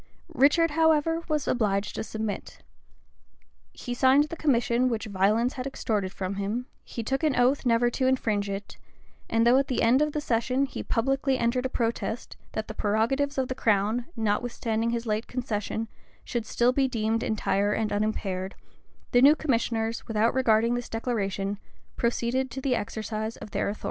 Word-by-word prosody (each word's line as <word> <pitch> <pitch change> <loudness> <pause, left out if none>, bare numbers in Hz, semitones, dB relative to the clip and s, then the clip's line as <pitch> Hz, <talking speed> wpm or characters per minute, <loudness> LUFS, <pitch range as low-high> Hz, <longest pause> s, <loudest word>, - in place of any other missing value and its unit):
Richard, 305 +4 +4
however, 320 +1 +3
was 305 -3 -1
obliged 205 -4 0
to - - -3
submit: 220 -2 -5 1.1
he 245 - -6
signed 265 +3 +5
the 305 +2 -6
commission 250 -4 +2
which 225 -2 -2
violence 215 +5 +1
had 260 0 -4
extorted 210 -8 -2
from 195 0 -4
him; 210 +5 -2 0.2
he 230 - -6
took 270 +7 -1
an 300 -4 +2
oath 250 +2 +2
never 240 +1 +3
to 260 +2 0
infringe 215 -6 +1
it; 200 +1 -6 0.5
and 230 0 +2
though 245 +3 +6
at 275 - 0
the 255 - 0
end 245 +5 +4
of 300 -1 +1
the 300 - -1
session 255 0 +1
he 275 - -6
publicly 270 +3 0
entered 250 +2 +1
a - - -13
protest, 230 -1 -2 0.2
that 220 - -3
the 215 - -6
prerogatives 230 +8 0
of 260 -1 +1
the 260 - -2
crown, 220 0 +1
notwithstanding 225 +1 -1
his 235 0 -2
late 215 0 -1
concession, 225 -3 -3 0.4
should 235 -2 -3
still 240 +1 +2
be 270 +1 +2
deemed 225 -2 0
entire 205 -1 0
and 215 0 -1
unimpaired,[] 200 -3 -2 0.6
the 245 - +5
new 285 +3 +8
commissioners, 230 -6 -1
without 225 +1 +2
regarding 230 -2 +3
this 245 0 -3
declaration, 205 -4 -2 0.4
proceeded 240 +2 0
to 255 - -6
the 265 -1 0
exercise 220 0 -3
of 210 - -10
their - - -1
authority. 205 - -5
235 Hz, 170 wpm, -27 LUFS, 215-260 Hz, 1.1 s, new